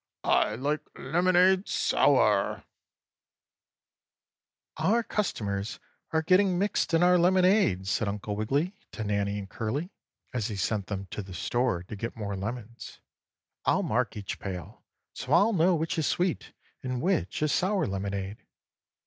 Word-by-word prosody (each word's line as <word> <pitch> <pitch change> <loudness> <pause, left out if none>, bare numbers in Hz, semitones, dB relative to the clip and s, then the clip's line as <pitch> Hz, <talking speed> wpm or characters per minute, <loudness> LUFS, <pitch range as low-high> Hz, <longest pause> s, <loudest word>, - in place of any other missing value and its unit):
I 105 - +2
like 145 +5 -1 0.2
lemonade 185 +3 +3
sour!" - - +2
6. - - -37 2.1
"Our 235 +2 +2
customers 105 - -2 0.3
are 160 -1 +1
getting 185 +2 +4
mixed 195 -3 +1
in 165 - +4
our 180 0 +5
lemonade," 180 - +3
said 100 +2 0
Uncle 105 0 -3
Wiggily 140 - 0 0.2
to 110 - -4
Nannie 100 -1 -1
and 100 -1 -6
Curly, 135 - -3 0.4
as 120 -5 -1
he 105 - -4
sent 100 +1 -1
them 100 -1 -4
to - - -4
the 95 -2 -9
store 120 0 0
to 95 - -8
get 115 +4 -5
more 100 -2 -3
lemons. 115 +3 -6 0.6
"I'll - - +2
mark 120 0 0
each 100 -2 -5
pail 90 -4 -7 0.3
so 130 - -3
I'll 200 +7 +5
know 180 0 +4
which 160 0 -1
is 155 - +1
sweet 180 -1 -1 0.3
and 130 -1 -3
which 150 - 0
is 155 - +2
sour 190 +1 +1
lemonade." 100 +1 -3
120 Hz, 145 wpm, -28 LUFS, -, 2.1 s, our